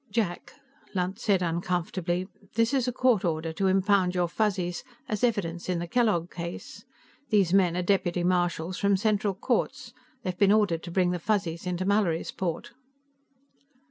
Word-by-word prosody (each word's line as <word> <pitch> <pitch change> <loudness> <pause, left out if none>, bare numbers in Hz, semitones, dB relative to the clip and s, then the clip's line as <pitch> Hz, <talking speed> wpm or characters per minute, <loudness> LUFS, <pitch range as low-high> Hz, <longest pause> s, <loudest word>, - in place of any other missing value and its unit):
"Jack," 200 -5 -2 0.4
Lunt 185 +3 -1
said 200 -6 +2
uncomfortably, 175 +1 -1 0.3
"this 230 +3 +2
is 260 -2 +1
a - - +1
court 245 -4 +2
order 160 -1 -1
to 195 +4 0
impound 190 -1 +3
your 175 -1 +2
Fuzzies 185 -2 -1 0.2
as 215 0 -3
evidence 185 -8 -1
in 180 - +1
the 170 - -3
Kellogg 190 -5 +1
case. 170 0 -7 0.5
These 195 -5 +3
men 180 -3 +4
are 180 - 0
deputy 175 -2 +1
marshals 175 -1 0
from 200 -1 +3
Central 205 -1 +1
Courts; 245 +4 -1 0.3
they've 185 -3 -2
been 200 +1 +4
ordered 205 -6 +3
to 170 - -7
bring 180 0 +2
the 180 - -2
Fuzzies 185 -3 -1
into 180 +1 -2
Mallorysport." 190 +1 -1
185 Hz, 155 wpm, -27 LUFS, 175-210 Hz, 0.5 s, men